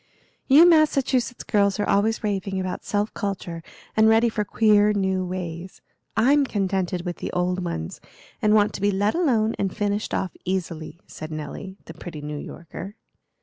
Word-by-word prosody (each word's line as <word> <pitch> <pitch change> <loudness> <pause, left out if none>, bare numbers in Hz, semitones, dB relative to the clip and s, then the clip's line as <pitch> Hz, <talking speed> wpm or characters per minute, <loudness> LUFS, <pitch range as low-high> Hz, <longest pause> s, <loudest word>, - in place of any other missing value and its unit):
"You 300 +6 +8
Massachusetts 275 -7 +2
girls 200 -1 +1
are 205 - 0
always 220 +3 +1
raving 195 -2 -2
about 185 -1 -4
self 205 +1 -1
culture, 185 -5 -4 0.3
and 220 0 +5
ready 225 +1 +4
for 215 -1 -1
queer 210 0 +4
new 190 -2 0
ways. 180 -1 -6 0.4
I'm 280 +5 +4
contented 190 -6 -1
with 175 -1 -4
the - - -5
old 180 +1 0
ones, 80 - -5 0.4
and 215 0 +4
want 210 -1 +3
to - - -6
be 205 - +3
let 205 +2 +1
alone 235 -10 +2
and 195 -2 -2
finished 205 0 -1
off 190 - -2
easily," 170 -3 -4
said 155 - -8
Nelly, 165 +5 -7
the 165 - -9
pretty 165 -2 -8
New 150 0 -5
Yorker. 175 +6 -9
200 Hz, 165 wpm, -24 LUFS, 180-215 Hz, 0.4 s, You